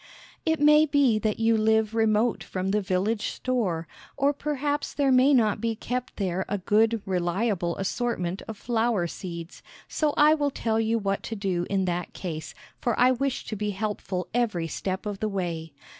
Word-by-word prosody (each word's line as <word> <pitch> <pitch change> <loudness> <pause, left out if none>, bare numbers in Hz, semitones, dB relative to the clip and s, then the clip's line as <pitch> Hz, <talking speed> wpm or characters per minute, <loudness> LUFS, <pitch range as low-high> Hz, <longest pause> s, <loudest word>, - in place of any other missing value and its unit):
It 320 -1 +2
may 300 +1 +6
be 280 -7 +3
that 215 0 -1
you 225 0 +3
live 220 0 +2
remote 225 +1 +2
from 185 0 -3
the 210 +1 +2
village 195 +4 0
store, 195 -11 -1 0.3
or 280 +1 +3
perhaps 290 0 -2
there 280 -2 +2
may 260 +2 +5
not 225 -6 +3
be 230 -1 0
kept 250 +3 -4
there 190 -2 -1
a 205 - 0
good, 215 +3 +2
reliable 180 0 0
assortment 195 -3 -2
of 220 - -6
flower 230 -5 0
seeds, 170 -1 -7 0.3
so 300 -2 0
I 300 +1 +7
will 290 -2 +1
tell 225 -4 -1
you 225 +1 +1
what 195 -2 -1
to 225 - -5
do 185 -4 -1
in 195 -1 +1
that 175 -1 -3
case, 160 -4 -6 0.2
for 240 -3 -1
I 250 +1 +6
wish 265 +1 -1
to 215 - -4
be 210 0 -2
helpful 195 -3 -3
every 220 -9 0
step 190 +5 -4
of 205 -2 -4
the 215 - -1
way. 170 -5 -3
215 Hz, 180 wpm, -26 LUFS, 185-245 Hz, 0.3 s, I